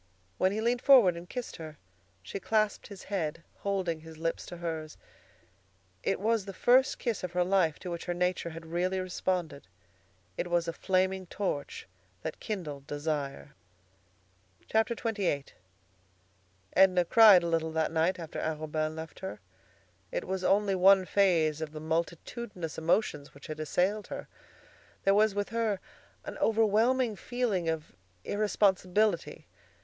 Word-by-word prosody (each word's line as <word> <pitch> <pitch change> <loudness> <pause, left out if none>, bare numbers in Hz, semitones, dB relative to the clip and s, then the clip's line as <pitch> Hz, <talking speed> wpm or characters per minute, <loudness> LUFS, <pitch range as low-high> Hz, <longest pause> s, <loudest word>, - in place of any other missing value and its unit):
When 185 - +3
he 215 +2 -2
leaned 240 +2 +1
forward 245 -12 +7
and 170 +1 -9
kissed 250 -2 -5
her, 155 -2 -9 0.5
she 100 - -6
clasped 215 +2 0
his 200 -2 -10
head, 165 -5 -3
holding 190 -5 -1
his 160 0 -12
lips 165 +1 -3
to 175 - -8
hers. 160 -2 -5 1.0
It 195 - 0
was 220 +1 +1
the 195 -2 -8
first 255 +2 +4
kiss 235 -7 -2
of 180 -1 -4
her 180 0 +2
life 180 -4 +2
to 180 - -7
which 170 - -5
her 175 - -1
nature 180 -1 0
had 165 0 -9
really 180 +3 -1
responded. 180 -4 -2 0.7
It 175 - -2
was 175 -1 +1
a 165 - -2
flaming 185 +1 0
torch 170 -7 -4 0.4
that - - -5
kindled 150 -10 -5
desire. 145 -1 -3 1.2
XXVIII 220 - 0 1.3
Edna 185 -2 +5
cried 210 -2 +8
a - - -1
little 165 -1 0
that 160 -1 0
night 165 +4 +1
after 165 -3 -6
Arobin 155 0 -2
left 160 0 -8
her. 190 0 -6 0.7
It - - -3
was 190 -1 -3
only 200 +1 +3
one 190 +1 +6
phase 165 -6 +2
of 155 -1 -5
the 155 - -6
multitudinous 170 +3 -3
emotions 160 -4 0
which 140 - -13
had 155 -1 -6
assailed 185 +7 0
her. - - -7 0.8
There 195 - +4
was 210 0 +3
with 205 0 -1
her 225 -3 0 0.5
an - - -7
overwhelming 225 +2 +3
feeling 220 -10 -1
of 160 -6 -4 0.3
irresponsibility. 205 0 +1
180 Hz, 145 wpm, -30 LUFS, 160-205 Hz, 1.3 s, cried